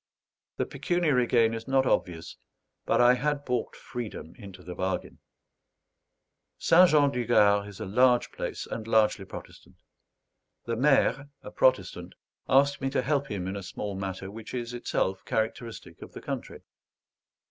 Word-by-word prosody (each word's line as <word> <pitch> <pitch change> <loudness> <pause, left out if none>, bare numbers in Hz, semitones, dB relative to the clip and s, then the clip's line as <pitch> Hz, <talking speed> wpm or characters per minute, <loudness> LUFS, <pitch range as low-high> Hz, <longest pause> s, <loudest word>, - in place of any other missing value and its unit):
The - - 0
pecuniary 155 -9 +1
gain 115 -2 +3
is 115 0 -6
not 135 0 +3
obvious, 85 -8 -1 0.5
but - - +2
I 120 0 +7
had 145 +2 -1
bought 125 -2 -2
freedom 115 -9 -7
into 95 -5 -12
the 90 +1 -7
bargain. 95 0 -3 1.4
St. 180 +2 +6
Jean 145 -2 +4
du 125 -2 -2
Gard 100 -2 +4
is 105 -1 -11
a 110 - -4
large 125 +5 +3
place, - - -5
and 110 -1 -6
largely 110 -3 +2
Protestant. - - -11 0.9
The 115 - -2
maire, 135 +1 +2
a - - -9
Protestant, - - +1 0.3
asked 140 +1 +3
me 135 - 0
to 130 - 0
help 140 +1 0
him 95 -3 -3
in 95 +1 -4
a 100 - -5
small 100 +2 -5
matter 95 0 -5
which 115 +3 -8
is 120 -1 -4
itself 95 -5 -2
characteristic 110 +1 -4
of - - -11
the - - -9
country. - - -6
115 Hz, 155 wpm, -28 LUFS, 100-135 Hz, 1.4 s, I